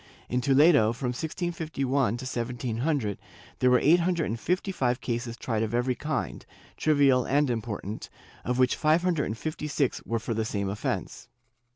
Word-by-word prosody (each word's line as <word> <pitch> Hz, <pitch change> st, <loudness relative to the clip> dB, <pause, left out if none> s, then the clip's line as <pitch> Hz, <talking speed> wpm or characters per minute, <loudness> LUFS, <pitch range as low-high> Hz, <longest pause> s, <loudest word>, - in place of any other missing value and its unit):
In 125 Hz, +1 st, 0 dB
Toledo, 140 Hz, -4 st, +5 dB
from 125 Hz, +1 st, -3 dB
1651 140 Hz, -, -1 dB
to 130 Hz, -, -7 dB
1700, 120 Hz, -1 st, -2 dB, 0.4 s
there 125 Hz, -, +4 dB
were 125 Hz, -, +6 dB
eight 160 Hz, +7 st, +5 dB
hundred 170 Hz, -1 st, +1 dB
and 115 Hz, -, -3 dB
fifty 185 Hz, -, -1 dB
five 125 Hz, -8 st, 0 dB
cases 120 Hz, -1 st, -3 dB
tried 110 Hz, -3 st, -2 dB
of 110 Hz, +1 st, -1 dB
every 125 Hz, +1 st, +1 dB
kind, 150 Hz, +5 st, -3 dB, 0.3 s
trivial 140 Hz, -4 st, +3 dB
and 140 Hz, 0 st, +2 dB
important, 110 Hz, -2 st, -4 dB, 0.3 s
of 125 Hz, +1 st, -1 dB
which 130 Hz, -1 st, +3 dB
five 155 Hz, +3 st, +2 dB
hundred 170 Hz, -5 st, +1 dB
and 110 Hz, -, -4 dB
fifty 155 Hz, +2 st, -4 dB
six 145 Hz, -3 st, 0 dB
were 115 Hz, -, -1 dB
for 115 Hz, +1 st, -3 dB
the 110 Hz, 0 st, 0 dB
same 100 Hz, -3 st, -2 dB
offence. 105 Hz, +2 st, -4 dB
125 Hz, 170 wpm, -27 LUFS, 115-150 Hz, 0.4 s, were